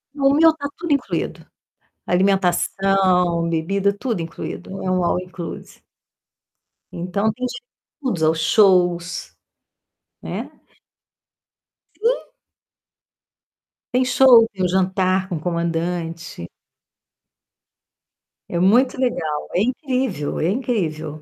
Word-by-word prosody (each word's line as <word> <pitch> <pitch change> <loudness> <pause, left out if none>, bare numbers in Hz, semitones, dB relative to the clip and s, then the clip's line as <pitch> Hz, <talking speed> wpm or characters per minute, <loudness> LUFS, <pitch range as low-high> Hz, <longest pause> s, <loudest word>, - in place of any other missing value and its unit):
O 275 -1 +3
meu 320 +2 +6
tá 285 -2 -4
tudo 340 -2 -4
incluído. 280 - -2 0.6
Alimentação, 185 -2 +2
bebida, 195 +5 0
tudo 225 -6 -2
incluído, 165 +3 -6
é 185 - -2
um 185 -1 +1
all 180 - +1
inclusive. 180 -2 -9 1.1
Então 200 +5 -1
tem 250 +4 -5
de 245 -1 -5 0.4
tudo. 170 - +1
Os 160 - -4
shows, 175 -2 +2 0.9
né? - - -5 1.5
Sim. 475 +4 -1 1.6
Tem 255 +1 +3
show, 250 -2 +6
tem 190 -2 -3
o 180 - +3
jantar 185 0 +1
com 185 - -4
o - - -4
comandante. 170 - -3 2.0
É 170 - -2
muito 245 +8 +3
legal. 165 - -1
É 180 - +3
incrível, 255 - -1
é 165 - +1
incrível. 160 - -2
185 Hz, 100 wpm, -21 LUFS, 170-245 Hz, 2.0 s, meu